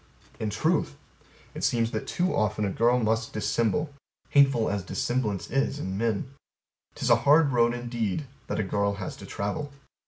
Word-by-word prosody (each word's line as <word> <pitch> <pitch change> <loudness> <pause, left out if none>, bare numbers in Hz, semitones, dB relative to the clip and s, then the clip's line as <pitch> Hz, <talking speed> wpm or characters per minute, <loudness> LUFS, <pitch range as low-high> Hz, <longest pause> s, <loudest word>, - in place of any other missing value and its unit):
In 110 - -1
truth 110 - 0 0.6
it - - -6
seems 115 -1 +1
that 110 - -4
too 180 +1 0
often 105 0 +1
a 100 - -1
girl 120 +5 +3
must 115 -1 0
dissemble 115 +7 0 0.4
hateful 135 -5 +4
as 100 -1 -1
dissemblance 105 0 -1
in 135 -7 -1
men. 115 +4 -1 0.6
T'is - - 0
a - - +7
hard 150 0 +5
road 120 -1 +3
indeed 120 0 -2 0.2
that - - -2
a - - +1
girl 100 +1 0
has 95 -1 -5
to - - -10
travel. 105 +9 -3
115 Hz, 160 wpm, -27 LUFS, 105-135 Hz, 0.6 s, a